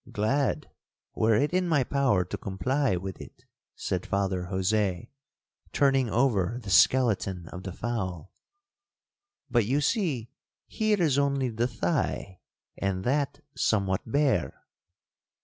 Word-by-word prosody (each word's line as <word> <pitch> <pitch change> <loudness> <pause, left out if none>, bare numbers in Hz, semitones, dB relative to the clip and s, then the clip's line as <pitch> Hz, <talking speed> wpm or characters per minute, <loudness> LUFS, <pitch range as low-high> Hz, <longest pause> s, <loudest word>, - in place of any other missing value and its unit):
'—'Glad, 130 +7 -1 0.5
were 110 0 +3
it 145 +9 +1
in 185 0 +1
my 145 -5 +3
power 125 -9 +1
to - - -5
comply 130 +4 0
with 95 +1 -6
it,' - - -13 0.3
said - - -2
Father 95 -2 -1
Jose, 95 0 -1 0.6
turning 135 -3 +3
over 115 -3 +1
the 100 - -5
skeleton 95 -3 +3
of 90 - -8
the 95 - -6
fowl; 95 -6 -4 1.2
'but 120 -5 +2
you 135 +4 +2
see 150 - -1 0.3
here 215 -2 0
is 150 -5 +3
only 140 -2 +1
the 115 +1 0
thigh, 115 - -2 0.4
and 95 -1 -1
that 140 +2 0
somewhat 95 -3 +1
bare.' 135 - 0
115 Hz, 125 wpm, -27 LUFS, 95-140 Hz, 1.2 s, were